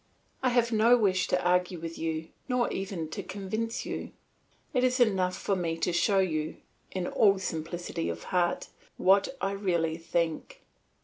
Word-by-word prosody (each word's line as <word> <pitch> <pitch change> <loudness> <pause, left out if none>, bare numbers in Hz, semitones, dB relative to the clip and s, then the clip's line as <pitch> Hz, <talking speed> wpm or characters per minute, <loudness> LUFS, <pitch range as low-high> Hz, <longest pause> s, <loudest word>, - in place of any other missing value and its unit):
I 255 - +3
have 240 -1 +2
no 230 +2 +5
wish 190 -5 +2
to 180 - +2
argue 180 0 +2
with 165 0 -6
you 160 0 -2 0.2
nor 250 -1 +1
even 190 -4 -3
to - - -4
convince 215 +4 -3
you; - - -5 0.6
it 255 -2 +2
is 255 +1 +2
enough 190 -6 +2
for 195 - 0
me 165 -3 -1
to 175 - 0
show 195 +3 +3
you, 155 -5 0 0.3
in 185 -2 -3
all 200 +1 +4
simplicity 165 - -3
of 85 0 -5
heart, 175 -1 +1 0.3
what 195 +2 +4
I 195 - 0
really 170 -5 0
think. 170 - -2
185 Hz, 165 wpm, -29 LUFS, 165-215 Hz, 0.6 s, no